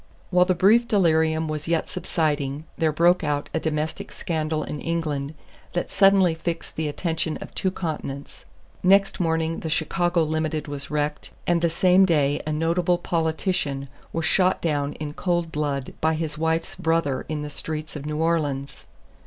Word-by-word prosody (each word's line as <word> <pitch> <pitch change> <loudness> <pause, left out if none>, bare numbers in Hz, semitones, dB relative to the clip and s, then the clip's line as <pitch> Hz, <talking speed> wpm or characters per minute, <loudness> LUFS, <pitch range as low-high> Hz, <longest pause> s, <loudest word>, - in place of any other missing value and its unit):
While 180 0 +5
the 185 0 +2
brief 220 +7 +5
delirium 160 -5 +2
was 155 0 -4
yet 165 -1 +1
subsiding 150 -5 -1
there 160 -1 +1
broke 170 +4 +3
out 145 -1 -1
a 160 - +1
domestic 155 0 -3
scandal 155 -2 -2
in 150 - -5
England 155 -3 -2 0.4
that 175 - -2
suddenly 195 -3 +5
fixed 165 +1 -4
the 160 -1 -1
attention 160 +1 -2
of - - -10
two 190 - 0
continents. 150 -6 -5 0.4
Next 195 +1 +4
morning 165 -1 0
the 160 - -4
Chicago 175 +2 +1
Limited 155 0 -1
was 145 0 -5
wrecked, 150 0 -2 0.2
and 175 -1 +2
the 170 - +3
same 185 +3 +5
day 145 -5 +2
a - - 0
notable 170 +3 +1
politician 160 -4 -1 0.2
was 165 -1 -2
shot 185 +2 +3
down 145 -3 -1
in 150 -1 -6
cold 175 -1 -1
blood 145 -3 -2
by 160 0 +2
his 155 -2 -3
wife's 160 +1 0
brother 160 -5 0
in 150 -1 -2
the 150 - -6
streets 155 +2 -5
of 150 0 -6
New 150 0 -2
Orleans. 145 -4 -1
160 Hz, 165 wpm, -24 LUFS, 150-170 Hz, 0.4 s, While